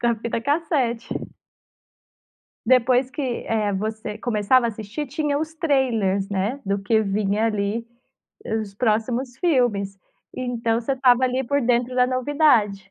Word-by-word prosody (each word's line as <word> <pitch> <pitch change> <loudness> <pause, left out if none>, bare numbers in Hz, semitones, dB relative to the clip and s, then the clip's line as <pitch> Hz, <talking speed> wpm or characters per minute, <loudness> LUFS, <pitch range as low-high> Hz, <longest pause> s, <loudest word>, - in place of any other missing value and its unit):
Da 240 -1 +2
fita 235 0 -2
cassete. 275 -4 -1 1.4
Depois 255 +1 +3
que, 290 - -5 0.2
eh, 215 -2 0
você 215 +2 -4
começava 235 +2 +2
a - - 0
assistir, 220 +7 -5
tinha 290 +1 -1
os 315 +1 -4
trailers, 235 - +1
né, 205 +7 -2
do 200 +1 0
que 220 +2 +2
vinha 205 +1 0
ali, 210 +1 -2 0.7
os 200 -2 -7
próximos 235 +3 -1
filmes, 240 - +1 0.4
então 235 -2 -1
você 240 +3 -1
estava, 255 -1 +4
ali, 255 +1 0
por 285 +3 +1
dentro 245 +1 +1
da 250 0 +4
novidade. 255 -7 +2
235 Hz, 135 wpm, -23 LUFS, 210-260 Hz, 1.4 s, estava